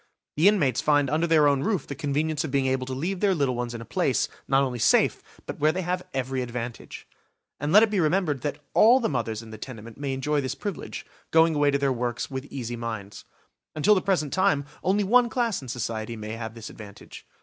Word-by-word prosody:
The 160 Hz, +6 st, +4 dB
inmates 150 Hz, -, +3 dB
find 145 Hz, -2 st, +2 dB
under 160 Hz, +3 st, +1 dB
their 155 Hz, -3 st, +5 dB
own 140 Hz, -2 st, +2 dB
roof 190 Hz, 0 st, -1 dB
the -, -, -6 dB
convenience 150 Hz, +1 st, -1 dB
of 160 Hz, -, -4 dB
being 135 Hz, 0 st, +1 dB
able 130 Hz, -1 st, 0 dB
to 130 Hz, -, -4 dB
leave 175 Hz, +8 st, -2 dB
their 195 Hz, -1 st, +2 dB
little 140 Hz, -5 st, +1 dB
ones 120 Hz, -1 st, -4 dB
in 115 Hz, -, -6 dB
a -, -, -8 dB
place, -, -, 0 dB, 0.2 s
not 135 Hz, +1 st, +3 dB
only 125 Hz, -3 st, -3 dB
safe, -, -, +3 dB, 0.2 s
but -, -, -7 dB
where 155 Hz, +1 st, +4 dB
they 185 Hz, +3 st, -3 dB
have 180 Hz, +1 st, -3 dB
every 130 Hz, 0 st, -2 dB
advantage. 120 Hz, -1 st, -6 dB, 0.5 s
And 145 Hz, +2 st, -2 dB
let 210 Hz, +4 st, +8 dB
it 220 Hz, -, +2 dB
be 205 Hz, -, +1 dB
remembered 155 Hz, -4 st, +1 dB
that 145 Hz, +1 st, -3 dB, 0.2 s
all 240 Hz, +4 st, +6 dB
the 230 Hz, -, 0 dB
mothers 115 Hz, -4 st, -2 dB
in 110 Hz, -, -12 dB
the 110 Hz, -, -9 dB
tenement 115 Hz, -1 st, -9 dB
may 140 Hz, -2 st, -2 dB
enjoy 145 Hz, +2 st, 0 dB
this 130 Hz, -, -3 dB
privilege, 205 Hz, -4 st, -6 dB, 0.2 s
going 165 Hz, 0 st, +4 dB
away 145 Hz, -1 st, +3 dB
to 140 Hz, -, +2 dB
their 140 Hz, -1 st, +1 dB
works 120 Hz, +1 st, -3 dB
with 130 Hz, 0 st, -4 dB
easy 120 Hz, -4 st, -5 dB
minds. 110 Hz, -4 st, -6 dB, 0.5 s
Until 175 Hz, +8 st, +4 dB
the 190 Hz, -, +2 dB
present 175 Hz, -8 st, 0 dB
time 145 Hz, -6 st, +2 dB, 0.2 s
only 200 Hz, +3 st, +2 dB
one 240 Hz, +4 st, +4 dB
class 230 Hz, -, -1 dB
in 130 Hz, -, -10 dB
society 115 Hz, -1 st, -4 dB
might 110 Hz, -1 st, -7 dB
have 115 Hz, 0 st, -6 dB
this 115 Hz, -2 st, -8 dB
advantage. 105 Hz, -2 st, -12 dB
140 Hz, 225 wpm, -26 LUFS, 120-165 Hz, 0.5 s, let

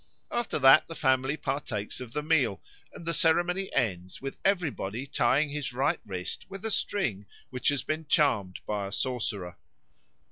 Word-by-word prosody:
After 240 Hz, -2 st, -1 dB
that 135 Hz, -2 st, +7 dB
the 165 Hz, -, -7 dB
family 130 Hz, +2 st, +2 dB
partakes 130 Hz, -7 st, -3 dB
of 125 Hz, -3 st, -7 dB
the 150 Hz, +4 st, -2 dB
meal, 145 Hz, -10 st, +2 dB, 0.3 s
and 170 Hz, -, -11 dB
the 170 Hz, -, -1 dB
ceremony 175 Hz, +4 st, +2 dB
ends 95 Hz, -8 st, -1 dB
with 135 Hz, 0 st, -5 dB
everybody 140 Hz, -, 0 dB
tying 140 Hz, +3 st, +2 dB
their 150 Hz, -, -2 dB
right 135 Hz, +3 st, +1 dB
wrist 90 Hz, -2 st, -5 dB
with 195 Hz, +2 st, -8 dB
a 225 Hz, -, -1 dB
string 115 Hz, -, -1 dB, 0.2 s
which 125 Hz, -1 st, -3 dB
has 145 Hz, -2 st, 0 dB
been 155 Hz, 0 st, -3 dB
charmed 120 Hz, -, +2 dB
by 100 Hz, -2 st, -2 dB
a -, -, -8 dB
sorcerer. 105 Hz, -7 st, -2 dB
135 Hz, 165 wpm, -29 LUFS, 105-160 Hz, 0.3 s, that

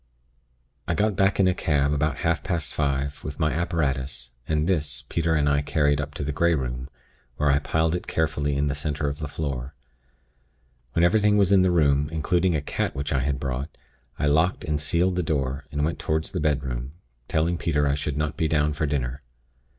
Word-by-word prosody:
"I 85 Hz, -, 0 dB
got 105 Hz, +1 st, +1 dB
back 95 Hz, +1 st, +2 dB
in 95 Hz, -, +5 dB
a 90 Hz, -, +3 dB
cab, 75 Hz, -4 st, +1 dB
about 75 Hz, 0 st, 0 dB
half 80 Hz, -3 st, +1 dB
past 85 Hz, -5 st, -1 dB
five, 70 Hz, -1 st, -1 dB
with 75 Hz, -, -6 dB
my 75 Hz, -2 st, +2 dB
apparatus, 70 Hz, -7 st, -1 dB, 0.2 s
and 75 Hz, -1 st, +1 dB
this, 75 Hz, -6 st, 0 dB
Peter 80 Hz, -1 st, +1 dB
and 75 Hz, -2 st, +2 dB
I 70 Hz, 0 st, +3 dB
carried 75 Hz, -1 st, +1 dB
up 70 Hz, +1 st, -7 dB
to 75 Hz, -, -3 dB
the 75 Hz, -, -2 dB
Grey 85 Hz, +3 st, +2 dB
Room, 65 Hz, -1 st, -4 dB, 0.5 s
where 75 Hz, -1 st, +3 dB
I 70 Hz, -, +3 dB
piled 80 Hz, +2 st, 0 dB
it 90 Hz, -, -3 dB
carefully 75 Hz, -2 st, 0 dB
in 70 Hz, -, +1 dB
the 70 Hz, -, 0 dB
center 75 Hz, 0 st, -2 dB
of 70 Hz, 0 st, -3 dB
the 75 Hz, -, -3 dB
floor. 70 Hz, -2 st, -4 dB, 1.2 s
When 85 Hz, -, +2 dB
everything 105 Hz, +2 st, +4 dB
was 100 Hz, -2 st, +3 dB
in 95 Hz, -2 st, +6 dB
the 95 Hz, -, +4 dB
room, 75 Hz, -4 st, +3 dB
including 85 Hz, +2 st, +1 dB
a 75 Hz, -, 0 dB
cat 70 Hz, -, -2 dB
which 70 Hz, +2 st, -2 dB
I 65 Hz, -, +2 dB
had 70 Hz, +1 st, -1 dB
brought, 65 Hz, +3 st, -4 dB, 0.4 s
I -, -, 0 dB
locked 80 Hz, +5 st, +2 dB
and 75 Hz, -1 st, -1 dB
sealed 90 Hz, +4 st, +1 dB
the -, -, +2 dB
door, 70 Hz, -3 st, -2 dB
and 75 Hz, 0 st, 0 dB
went 80 Hz, -, -2 dB
toward 80 Hz, 0 st, 0 dB
the -, -, -4 dB
bedroom, 70 Hz, -3 st, -1 dB, 0.3 s
telling 85 Hz, +2 st, 0 dB
Peter 75 Hz, -3 st, +1 dB
I 70 Hz, -, +2 dB
should 70 Hz, 0 st, -2 dB
not 75 Hz, -1 st, -1 dB
be 80 Hz, -, 0 dB
down 75 Hz, -1 st, +1 dB
for 75 Hz, +1 st, -1 dB
dinner. 70 Hz, -1 st, -2 dB
75 Hz, 205 wpm, -25 LUFS, 70-80 Hz, 1.2 s, in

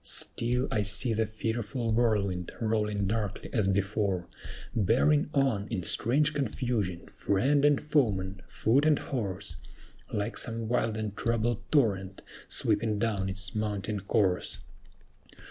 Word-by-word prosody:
"Still 125 Hz, +3 st, +1 dB
I 105 Hz, -, +1 dB
see 105 Hz, +5 st, +2 dB
the 110 Hz, 0 st, 0 dB
fearful 115 Hz, +2 st, -2 dB
whirlwind 100 Hz, -6 st, 0 dB
rolling 105 Hz, -3 st, 0 dB
darkly 105 Hz, 0 st, -3 dB
as 110 Hz, -5 st, +2 dB
before, 95 Hz, -1 st, 0 dB, 0.5 s
Bearing 125 Hz, -, +3 dB
on, 130 Hz, -8 st, +1 dB
in 90 Hz, -, -3 dB
strange 145 Hz, -, +3 dB
confusion, 115 Hz, -, -2 dB
friend 135 Hz, +9 st, +1 dB
and 145 Hz, -1 st, +4 dB
foeman, 100 Hz, -11 st, 0 dB
foot 135 Hz, +7 st, +2 dB
and 150 Hz, -2 st, +4 dB
horse, 100 Hz, -6 st, -4 dB, 0.5 s
Like 105 Hz, +3 st, -1 dB
some 115 Hz, -1 st, -1 dB
wild 115 Hz, -2 st, 0 dB
and 105 Hz, -2 st, -4 dB
troubled 115 Hz, 0 st, 0 dB
torrent 100 Hz, -9 st, +1 dB, 0.2 s
sweeping 110 Hz, 0 st, +2 dB
down 100 Hz, -3 st, 0 dB
its 95 Hz, -1 st, -2 dB
mountain 105 Hz, -1 st, -2 dB
course." 95 Hz, -, 0 dB
110 Hz, 125 wpm, -29 LUFS, 100-120 Hz, 0.5 s, and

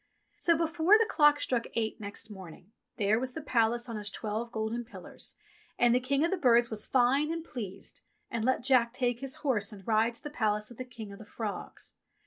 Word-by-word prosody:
So 335 Hz, -2 st, +3 dB
before 330 Hz, +4 st, +4 dB
the 450 Hz, -, +3 dB
clock 295 Hz, -1 st, +5 dB
struck 245 Hz, -4 st, -1 dB
eight 225 Hz, 0 st, -1 dB
next 205 Hz, +1 st, -6 dB
morning, 190 Hz, -1 st, -11 dB, 0.3 s
there 215 Hz, +1 st, +2 dB
was 255 Hz, 0 st, -4 dB
the -, -, -4 dB
Palace 235 Hz, -2 st, +1 dB
on 230 Hz, -3 st, -4 dB
its 205 Hz, -1 st, -4 dB
twelve 220 Hz, +3 st, -4 dB
golden 220 Hz, +1 st, -2 dB
pillars, 235 Hz, -, -9 dB, 0.4 s
and 240 Hz, -1 st, +4 dB
the 250 Hz, -, +4 dB
King 275 Hz, +4 st, +1 dB
of 335 Hz, -, -1 dB
the 385 Hz, -, +1 dB
Birds 240 Hz, -6 st, +4 dB
was 215 Hz, -1 st, -3 dB
fine 270 Hz, +4 st, +3 dB
and 330 Hz, 0 st, -3 dB
pleased, 200 Hz, -, -7 dB, 0.3 s
and 230 Hz, -1 st, -2 dB
let 260 Hz, +1 st, +1 dB
Jack 245 Hz, -3 st, +3 dB
take 245 Hz, -2 st, 0 dB
his 270 Hz, 0 st, -2 dB
horse 220 Hz, -6 st, +1 dB
and 195 Hz, -3 st, -12 dB
ride 225 Hz, +1 st, +2 dB
to -, -, -15 dB
the 295 Hz, -, -6 dB
palace 210 Hz, -4 st, 0 dB
of 240 Hz, -, -12 dB
the 255 Hz, -, -5 dB
King 230 Hz, -5 st, -9 dB
of 200 Hz, -, -11 dB
the -, -, -9 dB
Frogs. 210 Hz, -1 st, -6 dB
235 Hz, 215 wpm, -30 LUFS, 215-265 Hz, 0.4 s, clock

